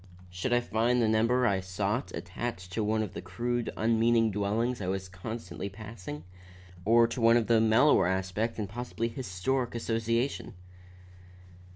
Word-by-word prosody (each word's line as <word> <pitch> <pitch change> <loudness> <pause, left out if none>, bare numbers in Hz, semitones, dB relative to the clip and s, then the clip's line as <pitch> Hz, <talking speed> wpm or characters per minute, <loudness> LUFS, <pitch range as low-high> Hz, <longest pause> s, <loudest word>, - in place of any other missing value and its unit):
Should 90 +8 -3
I 120 0 +4
find 120 +2 +1
the 115 - +3
number 115 +3 +3
I 100 -5 +2
sought 100 +6 -2
attached 90 0 -5
to 110 - -1
one 110 +1 +1
of 100 -3 -6
the - - -6
crude, 120 0 -2
unmeaning 115 0 +3
dwellings 105 +4 -1
I 90 - -3
was 95 0 -2
constantly 95 0 -6
passing, 100 -7 -8 0.6
or 115 +2 +6
to 115 +1 -4
one 115 +1 +6
of 115 - 0
mellower 115 +1 +5
aspect 95 +5 -1
and 105 -2 -2
possibly 115 +2 -3
historic 120 +2 -2
association? 115 +1 -1
115 Hz, 150 wpm, -29 LUFS, 95-120 Hz, 0.6 s, or